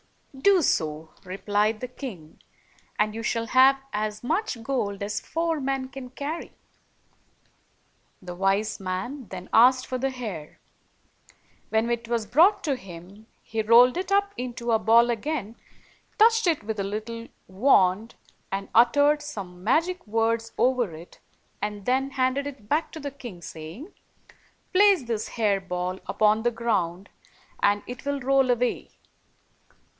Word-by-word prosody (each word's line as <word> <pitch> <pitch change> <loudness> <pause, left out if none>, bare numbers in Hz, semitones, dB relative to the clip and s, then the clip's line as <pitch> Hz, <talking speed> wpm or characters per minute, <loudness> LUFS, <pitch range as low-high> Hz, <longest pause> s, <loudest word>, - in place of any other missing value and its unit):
"Do 365 +6 +4
so," 155 - -1
replied 205 +3 0
the 250 - -3
king, 225 - -9 0.6
"and 210 0 +1
you 225 - -5
shall 230 0 -1
have 265 +2 +5
as 210 +1 -3
much 320 - -2
gold 205 -6 -2
as 210 +1 -2
four 330 -1 -2
men 265 -1 -2
can 265 -1 -9
carry." 285 +6 -6 1.7
The 180 -1 -8
wise 195 +3 0
man 195 +8 -4
then 185 0 -8
asked 255 +2 +6
for 255 - -4
the 270 +2 0
hair. 215 - -7 1.1
When 220 +1 +1
it 235 -1 -2
was 230 -2 -1
brought 340 - +4
to 285 -4 0
him, 195 0 -12 0.2
he 225 - -2
.rolled 240 +5 +6
it 375 +2 -3
up 400 0 +2
into 240 -1 -4
a 225 - +3
ball 235 +2 +5
again, 235 -2 -3 0.6
touched 450 -2 +5
it 325 -8 +1
with 215 0 -4
a - - 0
Jittle 225 +3 -5 0.2
wand, 195 0 +2 0.4
and 195 0 -3
uttered 285 +5 +4
some 185 -10 -8
magic 330 - +1
words 225 +1 0
over 245 -9 +1
it, 165 +3 -13 0.4
then 230 +7 -1
handed 265 +1 0
it 265 -7 -10
back 305 +7 0
to 320 - -7
the 285 -1 -5
king, 240 -10 -10
saying, 165 - -9 0.8
"Place 390 -4 +5
this 230 -3 -3
hair 210 -4 +1
ball 180 0 -3
upon 215 +1 +2
the 240 +1 +1
ground, 200 -6 -2 0.5
and 205 0 +2
it 245 0 -8
will 285 0 -1
roll 270 0 +3
away. 245 0 0
230 Hz, 145 wpm, -25 LUFS, 205-270 Hz, 1.7 s, asked